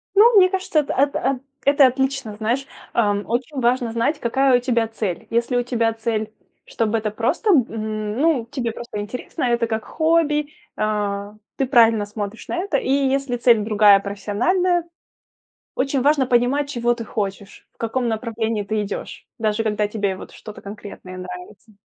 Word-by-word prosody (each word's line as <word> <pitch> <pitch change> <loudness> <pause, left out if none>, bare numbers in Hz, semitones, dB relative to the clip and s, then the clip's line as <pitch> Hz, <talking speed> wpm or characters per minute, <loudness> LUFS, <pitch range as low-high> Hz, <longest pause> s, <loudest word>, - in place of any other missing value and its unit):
Ну, 455 +4 +7
мне 370 -1 +7
кажется 375 -5 0
это, 290 - -1
эт 280 +2 +2
эт 265 -2 0 0.2
это 280 -1 +6
отлично, 265 -4 -2
знаешь, 235 +5 -1 0.3
э, - - +1 0.3
очень 250 +4 -2
важно 240 -1 +1
знать, 235 +7 0
какая 260 +2 +3
у 245 - -3
тебя 235 -3 +1
цель. 210 -6 -4
Если 235 +2 0
у 245 - +1
тебя 230 -2 0
цель 220 -1 -2 0.4
чтобы 225 -1 0
это 215 -1 -2
просто, 255 - 0
м, 215 - 0
ну 290 -7 +2
тебе 240 -4 -2
просто 230 -2 -7
интересно, 250 +8 -5
это 235 -1 +1
как 220 -1 -3
хобби, 315 -2 +1 0.3
а, 205 -1 -2 0.2
ты 270 - 0
правильно 225 -4 +5
смотришь 205 +1 -6
на - - -3
это, 345 -5 0
и - - -3
если 275 -2 +1
цель 235 -1 +5
другая 210 -2 +6
профессиональная, 245 - 0 0.9
очень 270 0 0
важно 285 -1 +3
понимать 250 +4 +2
чего 240 -3 +1
ты 235 -1 -4
хочешь, 200 -2 -5
в - - -41
каком 235 +2 -1
направлении 225 -1 -2
ты 215 +1 -1
идешь, 200 -1 -7
даже 220 0 0
когда 210 -1 0
тебе 205 -3 -2
вот - - -11
что-то 215 -1 -11
конкретное 200 -2 -9
нравится. 180 +4 -10
235 Hz, 170 wpm, -21 LUFS, 215-270 Hz, 0.9 s, Ну